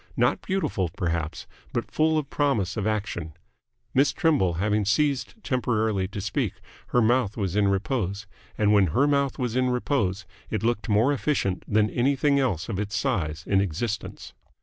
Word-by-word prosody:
Not -, -, +2 dB
beautiful, 185 Hz, -, -1 dB
perhaps, 80 Hz, -3 st, -2 dB, 0.3 s
but 115 Hz, -3 st, -3 dB
full 155 Hz, 0 st, +2 dB
of 145 Hz, -3 st, -3 dB
promise 115 Hz, -11 st, 0 dB
of 110 Hz, -1 st, -1 dB
action. 100 Hz, -7 st, -2 dB, 0.6 s
Miss 135 Hz, +1 st, +4 dB
Trimble 135 Hz, -, +2 dB
having 105 Hz, +4 st, +1 dB
ceased 135 Hz, -, +1 dB
temporarily 110 Hz, -7 st, 0 dB
to 100 Hz, +1 st, -7 dB
speak, 100 Hz, 0 st, -1 dB, 0.3 s
her 125 Hz, -, +2 dB
mouth 115 Hz, -2 st, +2 dB
was 95 Hz, -3 st, -2 dB
in 105 Hz, -1 st, +3 dB
repose, 100 Hz, 0 st, -1 dB, 0.3 s
and 105 Hz, -1 st, +3 dB
when 100 Hz, -3 st, +5 dB
her 140 Hz, -, +5 dB
mouth 140 Hz, -2 st, +1 dB
was 125 Hz, -2 st, -2 dB
in 130 Hz, 0 st, +2 dB
repose 110 Hz, -7 st, 0 dB, 0.2 s
it -, -, -2 dB
looked 115 Hz, -1 st, 0 dB
more 110 Hz, +7 st, +3 dB
efficient 135 Hz, -10 st, -1 dB
than 105 Hz, 0 st, +3 dB
anything 140 Hz, +3 st, +2 dB
else 100 Hz, -, 0 dB
of 100 Hz, -4 st, -3 dB
its 105 Hz, +1 st, -3 dB
size 80 Hz, -, -1 dB
in 95 Hz, -1 st, +3 dB
existence. 100 Hz, +4 st, -4 dB
110 Hz, 165 wpm, -26 LUFS, 100-130 Hz, 0.6 s, when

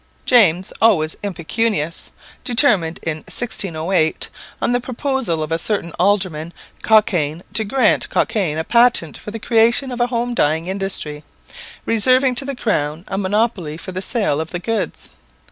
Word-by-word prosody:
James, 190 Hz, -7 st, +4 dB
always 160 Hz, -9 st, +3 dB
impecunious, 170 Hz, -2 st, -2 dB, 0.3 s
determined 210 Hz, -, +2 dB
in 160 Hz, -1 st, -2 dB
1608, 170 Hz, -4 st, 0 dB, 0.3 s
on -, -, 0 dB
the 245 Hz, 0 st, +1 dB
proposal 255 Hz, -, -2 dB
of 155 Hz, -, -6 dB
a 165 Hz, -, 0 dB
certain 195 Hz, -5 st, -2 dB
Alderman 180 Hz, -4 st, 0 dB, 0.3 s
Cockayne, 175 Hz, -7 st, +2 dB
to 220 Hz, -, +2 dB
grant 225 Hz, +1 st, +2 dB
Cockayne 180 Hz, -8 st, 0 dB
a 160 Hz, -, -1 dB
patent 235 Hz, -7 st, +3 dB
for -, -, -9 dB
the 220 Hz, -, -5 dB
creation 235 Hz, +4 st, +2 dB
of 245 Hz, -, -5 dB
a 240 Hz, -, +3 dB
home 240 Hz, 0 st, -2 dB
dyeing 160 Hz, -5 st, +1 dB
industry, 185 Hz, -6 st, -3 dB, 0.6 s
reserving 255 Hz, +4 st, +3 dB
to 250 Hz, +3 st, -2 dB
the 275 Hz, 0 st, -4 dB
crown 160 Hz, -8 st, -2 dB
a 195 Hz, -, -3 dB
monopoly 200 Hz, -5 st, -1 dB
for 175 Hz, -, -7 dB
the 185 Hz, 0 st, -4 dB
sale 195 Hz, -, 0 dB
of 160 Hz, -, -6 dB
the 175 Hz, -, -4 dB
goods. 225 Hz, +5 st, -4 dB
195 Hz, 150 wpm, -19 LUFS, 160-235 Hz, 0.6 s, James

